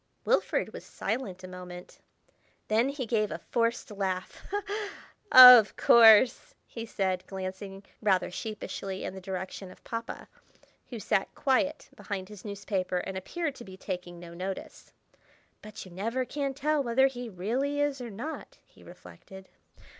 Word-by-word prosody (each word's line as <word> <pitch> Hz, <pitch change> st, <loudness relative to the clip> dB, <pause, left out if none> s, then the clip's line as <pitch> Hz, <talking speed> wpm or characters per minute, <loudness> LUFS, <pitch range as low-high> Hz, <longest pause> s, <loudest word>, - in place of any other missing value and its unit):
Wilfrid -, -, 0 dB
was -, -, -8 dB
silent 205 Hz, -6 st, -4 dB
a -, -, -7 dB
moment; 180 Hz, -1 st, -10 dB, 0.7 s
then 225 Hz, +5 st, +2 dB
he 280 Hz, -2 st, -4 dB
gave 215 Hz, -2 st, 0 dB
a -, -, -4 dB
forced 230 Hz, -1 st, -2 dB
laugh. 190 Hz, -2 st, -4 dB, 0.9 s
"Of 250 Hz, -4 st, +10 dB
course!" 235 Hz, -, +6 dB
he 230 Hz, -1 st, -8 dB
said, 185 Hz, -3 st, -1 dB
glancing 195 Hz, +1 st, -7 dB, 0.2 s
rather 190 Hz, -4 st, +1 dB
sheepishly 195 Hz, -2 st, -6 dB
in -, -, -5 dB
the 190 Hz, -, -9 dB
direction 190 Hz, 0 st, -6 dB
of 185 Hz, -, -16 dB
Papa, 230 Hz, 0 st, -6 dB, 0.6 s
who 235 Hz, -, -6 dB
sat 195 Hz, -1 st, -1 dB
quiet 285 Hz, +3 st, 0 dB
behind 190 Hz, -2 st, -6 dB
his 210 Hz, -3 st, -12 dB
newspaper, 200 Hz, -3 st, -3 dB
and 190 Hz, +1 st, -4 dB
appeared 295 Hz, -, -3 dB
to 245 Hz, -, -11 dB
be 190 Hz, -3 st, -12 dB
taking 180 Hz, -2 st, -6 dB
no 170 Hz, -1 st, -11 dB
notice. 185 Hz, +2 st, -7 dB, 0.7 s
("But 215 Hz, -1 st, -10 dB
you 185 Hz, -, -13 dB
never 230 Hz, +8 st, -2 dB
can 275 Hz, 0 st, -3 dB
tell 300 Hz, +2 st, 0 dB
whether 260 Hz, +1 st, +3 dB
he 245 Hz, -3 st, -3 dB
really 245 Hz, +10 st, -2 dB
is 290 Hz, -2 st, 0 dB
or 240 Hz, -, -6 dB
not," 240 Hz, +10 st, -7 dB
he -, -, -22 dB
reflected.) 190 Hz, 0 st, -14 dB
210 Hz, 145 wpm, -28 LUFS, 190-250 Hz, 0.9 s, Of